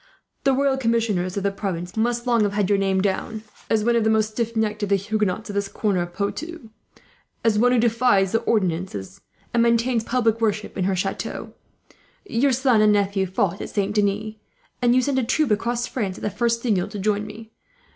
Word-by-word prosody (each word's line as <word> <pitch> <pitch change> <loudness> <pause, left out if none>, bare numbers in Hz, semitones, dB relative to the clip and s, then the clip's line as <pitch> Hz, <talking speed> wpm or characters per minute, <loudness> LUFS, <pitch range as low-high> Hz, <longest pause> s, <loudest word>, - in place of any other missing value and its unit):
The 270 - +4
royal 270 0 +2
commissioners 225 -7 0
of 200 - -1
the 200 - +1
province 180 -3 -4
must 235 +2 0
long 235 -2 +3
have 205 -1 +1
had 205 -1 0
your 200 - +3
name 190 -1 +1
down, 215 +3 -2 0.3
as 220 -1 +2
the 230 -1 +2
most 220 -1 +2
stiff 230 +1 -3
necked 215 -1 -1
of 205 - -1
the 200 - +4
Huguenots 210 +1 -1
of - - -8
this 200 0 -1
corner 200 -2 -1
of 175 0 -4
Poitou, 245 - -5 0.7
as 220 -2 +3
one 245 +2 +4
who 250 - +3
defies 225 -4 +3
the 225 - +2
ordinances, 180 - -2 0.3
and 235 - +3
maintains 235 0 +2
public 230 -2 +1
worship 215 -1 -1
in 185 - -1
her 190 0 +1
chateau. 195 +2 -4 0.7
Your 275 -5 +1
son 255 -3 +3
and 215 0 +5
nephew 200 -1 +1
fought 190 +1 -1
at - - -5
Saint 205 0 -1
Denis; 210 +1 0 0.5
and 245 0 +4
you 255 - +4
sent 265 0 +1
a - - 0
troop 265 +2 +1
across 235 +3 0
France, 200 -7 -3
at - - -11
the 210 - -1
first 230 +3 0
signal, 205 -7 +1
to - - -7
join 210 +1 0
me. 220 +1 -11
215 Hz, 205 wpm, -23 LUFS, 200-235 Hz, 0.7 s, and